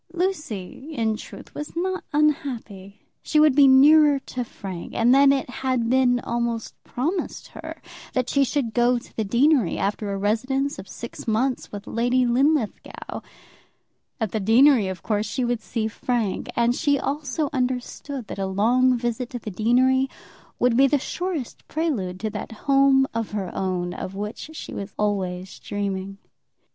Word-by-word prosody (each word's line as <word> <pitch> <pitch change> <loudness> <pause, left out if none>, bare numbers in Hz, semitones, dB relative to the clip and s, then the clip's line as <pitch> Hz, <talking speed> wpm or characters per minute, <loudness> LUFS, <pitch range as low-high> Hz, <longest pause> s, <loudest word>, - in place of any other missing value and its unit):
Lucy, 305 - -3
in 220 -2 +1
truth, - - -11
was 295 +2 -7
not 370 +2 -2
unhappy. 255 -10 -1 0.2
She 305 - +1
would 305 -2 +6
be 285 -1 +7
nearer 290 +2 +7
to 255 -2 -5
Frank; 190 -6 -8
and 235 +2 +4
then 275 +1 +6
it 275 -1 0
had 250 -2 -1
been 255 -1 +4
almost 235 -1 -2
promised 325 +9 -3
her - - -9 0.3
that 255 -1 0
she 280 +1 +3
should 265 -4 -1
go 245 +1 +3
to 235 - -11
the 220 - 0
deanery, 240 - +3
after 205 +1 -2
a 195 - -2
residence 260 +8 0
of 190 - -9
six 235 - -8
months 245 +4 0
with 205 0 -7
Lady 245 +2 +1
Linlithgow. 260 0 0 1.0
At 220 -4 -1
the 220 - -1
deanery 230 +2 +5
of 185 -3 -6
course 210 -1 0
she 250 +3 -1
would 240 -1 -1
see 220 0 -2
Frank; 225 -2 -2
and 235 0 +3
she 285 +2 +2
also 285 +1 -2
understood 255 0 -3
that 200 - -7
a 195 - -1
long 245 +6 +3
visit 240 +1 -2
to 250 - -5
the 215 -2 -7
deanery 255 +6 +3 0.5
would 245 -1 +2
be 270 +3 +6
the 290 - +3
surest 335 -1 -4
prelude 230 - -2
to 215 -1 -2
that 210 +1 -6
home 275 -1 +5
of 225 -2 -3
her 195 -4 -3
own 180 -2 -2
of 185 +1 -6
which 210 +8 -5
she - - -8
was 200 0 -6
always 190 -3 -2
dreaming. 195 -1 -4
245 Hz, 165 wpm, -24 LUFS, 210-275 Hz, 1.0 s, be